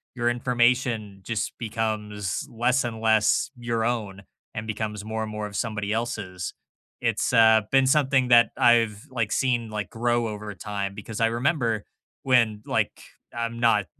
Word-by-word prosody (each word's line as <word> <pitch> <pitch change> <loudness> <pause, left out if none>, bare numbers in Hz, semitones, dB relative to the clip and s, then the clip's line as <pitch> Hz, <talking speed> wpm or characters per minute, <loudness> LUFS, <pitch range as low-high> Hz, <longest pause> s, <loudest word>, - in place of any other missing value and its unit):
your 120 -1 +1
information 120 -4 +1
just 110 +1 -3
becomes 110 +1 -3
less 120 +3 +1
and 115 -2 -5
less 110 +4 +3
your 115 -2 -2
own 105 -5 -2 0.3
and 110 +1 -5
becomes 105 -1 -4
more 110 0 -3
and 110 - -5
more 105 0 -4
of 100 - -11
somebody 105 -3 -2
else's. 105 -5 -3 0.5
It's, - - 0
uh, 110 -1 +6
been 135 -1 +4
something 135 -3 +3
that 120 -2 +6
I've, 115 -3 +3
like, 115 -4 -2
seen, 120 -4 0
like, 105 -2 -4
grow 120 0 0
over 105 -1 -6
time 100 +1 -4
because 105 +1 -7
I 115 - +4
remember 115 -2 0 0.4
when, 115 -5 +3
like - - -1 0.4
I'm 115 0 -3
not 110 -4 +3
115 Hz, 155 wpm, -25 LUFS, 105-120 Hz, 0.5 s, uh